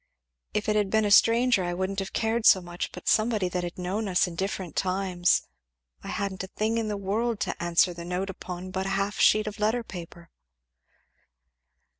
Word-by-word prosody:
If 210 - -1
it 215 - +2
had 205 -2 +1
been 220 +1 +2
a 205 - 0
stranger 230 0 +5
I 175 0 -2
wouldn't 190 +2 -2
have 195 - -4
cared 225 0 +1
so 190 - +8
much, 175 -1 -5
but - - -11
somebody 215 -3 +2
that 180 0 -2
had 175 0 -6
known 190 +4 -2
us 180 -2 +3
in 180 - -6
different 190 -1 -4
times 185 -2 +1 0.6
I - - -8
hadn't 195 -2 -3
a - - -6
thing 220 +4 -1
in 225 - -2
the 210 -1 -2
world 215 +3 -1
to - - -3
answer 175 +1 +3
the 170 0 -8
note 180 +3 -3
upon 180 0 -7
but 190 0 -2
a 195 0 0
half 200 +1 -2
sheet 215 0 +5
of 215 0 -6
letter 220 +3 +1
paper." 170 -4 -10
195 Hz, 200 wpm, -27 LUFS, 180-215 Hz, 0.6 s, so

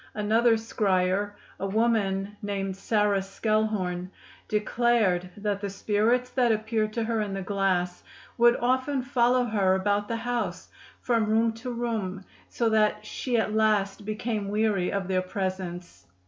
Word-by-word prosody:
Another 225 +3 +3
scryer, 205 -3 0 0.3
a 195 - -2
woman 205 -2 0
named 195 -2 -3
Sarah 205 -1 +1
Skelhorn, 195 -3 -1 0.4
declared 210 -4 +1
that 205 -1 -2
the 200 - -2
spirits 220 +5 +1
that 245 -3 +2
appeared 215 0 0
to 230 - -1
her 225 -1 0
in 200 -2 -3
the 195 - -4
glass 185 -2 0 0.3
would 240 0 +5
often 260 +2 0
follow 250 -1 +2
her 200 -5 +2
about 205 +2 0
the 230 - -2
house 245 +1 -3 0.3
from 230 -3 +1
room 225 +1 +2
to 225 +3 -7
room, 220 -6 -3 0.2
so 235 - 0
that 215 -1 +2
she 245 +2 -2
at 215 -1 0
last 210 -2 +1
became 215 0 -3
weary 210 -3 +1
of 195 -2 -2
their 185 -1 +1
presence. 185 - -5
210 Hz, 145 wpm, -27 LUFS, 195-230 Hz, 0.4 s, would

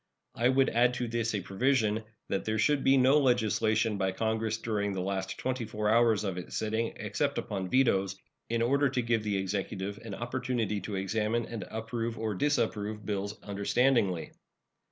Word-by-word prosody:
I 120 +2 +2
would 130 +1 +4
add 125 +1 +3
to 120 - -2
this 115 -1 -1
a 100 - -1
provision 110 +2 +1 0.2
that 100 - -1
there 110 0 -1
should 140 +5 +2
be 135 0 +5
no 135 +3 +5
legislation 110 -4 +2
by 95 -1 0
Congress 110 +1 -1
during 105 -3 -1
the 95 - -3
last 95 0 -2
twenty 130 -1 -2
four 105 -1 -1
hours 115 -2 +4
of 95 -3 -2
its 90 - -6
sitting, 110 +1 -1
except - - -2
upon 95 -2 -3
vetoes, 100 -7 +2 0.3
in 115 0 +1
order 140 +3 +3
to 130 -1 0
give 115 -1 +1
the 105 -2 0
Executive 95 +1 -3
an 110 -4 -7
opportunity 120 -4 -2
to 105 - -5
examine 110 +4 0
and 115 -5 -6
approve 115 +1 -3
or 110 -1 -2
disapprove 110 -3 -1
bills 100 +1 -3
understandingly. 100 -2 +1
110 Hz, 175 wpm, -30 LUFS, 100-120 Hz, 0.3 s, be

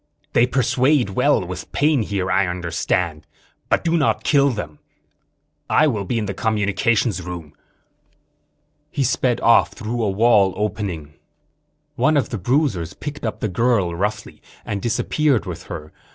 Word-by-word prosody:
They 120 - +4
persuade 130 -1 +2
well - - +2
with - - -7
pain 150 -3 +2
here, 100 -3 -2
I 100 -1 +2
understand. 85 -2 -2 0.4
But - - +2
do 170 0 +1
not 150 -4 +1
kill 140 -1 +4
him. 75 -9 -6 0.9
I - - +4
will 110 -9 -1
be 120 - -1
in 110 - -1
the 100 - -3
communications 105 0 0
room." 85 -4 -8 1.4
He 140 - -1
sped 125 0 +1
off, 115 - +4
through 120 +1 -4
a 105 - +1
wall 100 -2 +3
opening. 100 -8 -3 0.8
One 155 -1 +3
of 140 - 0
the 115 - -4
bruisers 110 - 0
picked 145 0 -7
up 110 - -5
the - - 0
girl, 105 -3 +1
roughly, 105 +5 -3 0.2
and 100 -1 -3
disappeared 135 +3 +1
with - - -7
her. 75 0 -8
105 Hz, 150 wpm, -21 LUFS, 95-125 Hz, 1.4 s, They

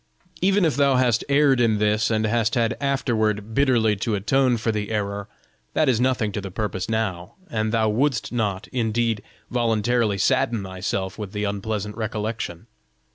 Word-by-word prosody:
Even 195 0 +3
if 155 -6 +1
thou 140 -2 +4
hast 125 -3 +2
erred 140 -3 +4
in 110 -3 +3
this, 105 +1 +2
and 110 -1 +1
hast 115 +2 +1
had 115 -2 +1
afterward 110 -6 0
bitterly 120 -5 +3
to 105 +2 -1
atone 125 +5 +2
for 115 0 0
the 105 -1 -3
error, 100 -2 -2 0.5
that 155 - +3
is 125 -3 +2
nothing 125 -5 +1
to 100 - -4
the 100 - -6
purpose 95 0 -3
now, 100 -6 -2 0.2
and 110 -1 0
thou 110 -1 +2
wouldst 120 +3 0
not, 105 -5 -2
indeed, 115 -2 0 0.3
voluntarily 115 -2 +1
sadden 105 +3 +1
thyself 95 +1 -4
with 105 -2 -6
the 105 0 -2
unpleasant 105 +1 -3
recollection. 110 -4 -4
110 Hz, 165 wpm, -23 LUFS, 105-120 Hz, 0.5 s, thou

